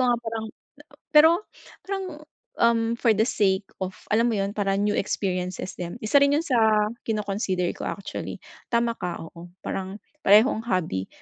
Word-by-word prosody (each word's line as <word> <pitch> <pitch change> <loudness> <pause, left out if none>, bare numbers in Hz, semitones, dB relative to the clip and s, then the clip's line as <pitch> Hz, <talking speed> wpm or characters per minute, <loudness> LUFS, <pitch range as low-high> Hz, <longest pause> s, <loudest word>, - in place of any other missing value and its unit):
nga 240 - +3
parang 225 -1 -5 0.7
pero 310 +1 +8 0.5
parang, 390 0 -3 0.6
um, 230 0 +3
for 235 0 +2
the 215 +1 +2
sake 195 -5 +1 0.2
of 185 - -5 0.2
alam 230 +3 +3
mo 225 - 0
yun, 195 +1 -1
parang 195 -1 +1
new 210 0 +1
experiences 185 -2 -2
din. 175 +1 -6
Isa 215 +6 +1
rin 280 0 +4
yun 320 - 0
sa 260 -6 +1 0.5
kino-consider 200 -4 -1
ko, - - -9
actually. 200 - -5 0.3
Tama 235 0 +1
ka, 180 -5 -4
oo. 170 +1 -12 0.2
Parang 190 +1 -4 0.3
parehong 215 +4 +5
hobby 160 - -1
210 Hz, 155 wpm, -25 LUFS, 190-235 Hz, 0.7 s, pero